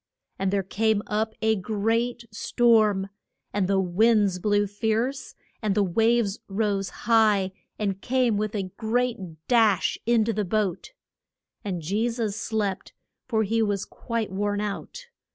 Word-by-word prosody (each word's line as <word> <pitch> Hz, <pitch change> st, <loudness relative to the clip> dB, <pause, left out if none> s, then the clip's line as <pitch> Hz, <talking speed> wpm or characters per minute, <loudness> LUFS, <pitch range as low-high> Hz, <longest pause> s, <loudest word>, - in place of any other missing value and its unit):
And 195 Hz, 0 st, +1 dB
there 200 Hz, -1 st, +1 dB
came 215 Hz, +2 st, +1 dB
up 220 Hz, +1 st, -1 dB
a 220 Hz, 0 st, +3 dB
great 225 Hz, +4 st, -1 dB
storm, 210 Hz, -3 st, +2 dB, 0.4 s
and 200 Hz, -3 st, +1 dB
the 195 Hz, 0 st, +2 dB
winds 200 Hz, +1 st, +3 dB
blew 205 Hz, +1 st, +2 dB
fierce, 220 Hz, +6 st, -2 dB, 0.3 s
and 210 Hz, -3 st, 0 dB
the 205 Hz, -, +3 dB
waves 225 Hz, +2 st, +2 dB
rose 200 Hz, -1 st, -1 dB, 0.2 s
high 215 Hz, -4 st, +4 dB, 0.3 s
and 200 Hz, -2 st, -2 dB
came 250 Hz, -3 st, +1 dB
with 215 Hz, +1 st, -2 dB
a 190 Hz, -3 st, -3 dB
great 240 Hz, +1 st, 0 dB, 0.3 s
dash 220 Hz, -6 st, +3 dB
in 235 Hz, -2 st, +4 dB
to 230 Hz, -, 0 dB
the 210 Hz, 0 st, -1 dB
boat. 200 Hz, -, -2 dB, 0.7 s
And 180 Hz, -5 st, -4 dB
Je 210 Hz, +8 st, 0 dB
sus 230 Hz, -4 st, -2 dB
slept, 210 Hz, -3 st, -3 dB, 0.3 s
for 220 Hz, -3 st, +1 dB
he 225 Hz, +2 st, +1 dB
was 205 Hz, -3 st, 0 dB
quite 230 Hz, -4 st, -4 dB
worn 205 Hz, +1 st, -1 dB
out. 210 Hz, -, -5 dB
215 Hz, 145 wpm, -25 LUFS, 200-225 Hz, 0.7 s, high